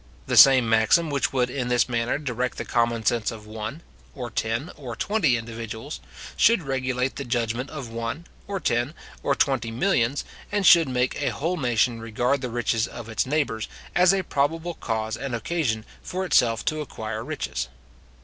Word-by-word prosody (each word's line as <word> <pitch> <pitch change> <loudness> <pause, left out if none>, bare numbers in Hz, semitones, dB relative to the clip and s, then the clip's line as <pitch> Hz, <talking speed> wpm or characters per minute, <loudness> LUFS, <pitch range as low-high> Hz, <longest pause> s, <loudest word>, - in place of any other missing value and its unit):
The - - -1
same 130 -3 +8
maxim 115 +9 +3
which 140 -1 0
would 125 -2 +1
in 125 -2 -2
this 125 -1 +3
manner 120 0 0
direct 125 -3 -2
the - - -4
common 115 -2 0
sense 115 +1 +2
of 110 -2 -8
one, 110 +8 -6 0.3
or 125 -4 -5
ten, 115 +10 -2
or 125 -5 -7
twenty 160 - +2
individuals, 115 +4 -6 0.4
should 230 -6 +4
regulate 130 -1 -1
the 140 - -3
judgment 120 +1 -1
of 135 -5 -6
one, 115 +8 -4 0.2
or 195 -1 -2
ten, 120 0 0 0.3
or 140 - +1
twenty 130 -5 +1
millions, 125 0 +1 0.3
and 205 -1 0
should 165 -6 +7
make 125 +2 0
a 140 - +1
whole 165 +5 -1
nation 120 -5 +1
regard 120 +5 0
the 125 - -3
riches 115 -1 0
of 115 -2 -9
its 110 - 0
neighbours, 135 -7 0 0.3
as 180 0 +6
a 195 -1 +1
probable 160 +5 -1
cause 110 -5 -2
and 135 -3 -4
occasion 115 -4 -1 0.2
for 185 +1 -3
itself 115 -9 +3
to 155 0 0
acquire 110 -5 -5
riches. 135 - -3
125 Hz, 175 wpm, -25 LUFS, 115-145 Hz, 0.4 s, same